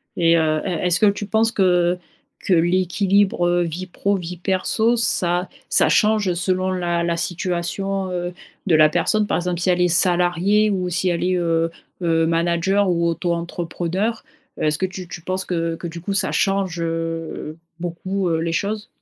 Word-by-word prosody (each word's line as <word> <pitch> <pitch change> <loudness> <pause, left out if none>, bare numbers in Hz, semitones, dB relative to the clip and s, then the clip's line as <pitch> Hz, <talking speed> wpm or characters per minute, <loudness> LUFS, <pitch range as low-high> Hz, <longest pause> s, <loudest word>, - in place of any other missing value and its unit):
Et 170 0 +4
heu, 155 -1 +1
est 180 -1 -1
est-ce 175 0 +2
que - - +4
tu 205 +1 0
penses 220 +2 +2
que 180 -3 +2 0.4
que 190 - 0
l'équilibre, 185 +2 +2
heu, 175 0 +2
vie 175 +3 -5
pro, 200 +3 -1
vie 180 -1 -5
perso 205 +6 +1
ça 180 -5 +1 0.2
ça - - +3
change 210 -4 +3
selon 185 +1 0
la 175 -2 -1
la 170 0 0
situation, 185 +2 -2
heu, 175 0 -3 0.3
de 170 - +4
la 155 0 +6
personne? 205 +6 +1
Par - - 0
exemple, 175 -1 -2
si 180 - 0
elle 180 0 +2
est 180 - +4
salariée 180 +4 +3
ou 185 -3 -1
si 180 +1 0
elle 170 0 -1
est, 185 0 +1
heu 165 -1 0 0.3
heu, 165 -1 +2
manager 170 +4 +1
ou 170 -1 +1
auto-entrepreneur, 175 +5 -2 0.3
est-ce 150 0 0
que 190 - 0
tu 185 -1 -7
tu 165 -1 -8
penses 185 +2 -3
que 165 -2 -1
que, 170 - -6
du 170 +1 -7
coup, 200 +4 -3
ça 195 - +1
change, 195 -3 0
heu, 165 -1 -4 0.2
beaucoup, 180 +2 -3
heu, 165 -1 +1
les 165 0 -1
choses? 210 +4 -2
175 Hz, 180 wpm, -21 LUFS, 170-190 Hz, 0.4 s, la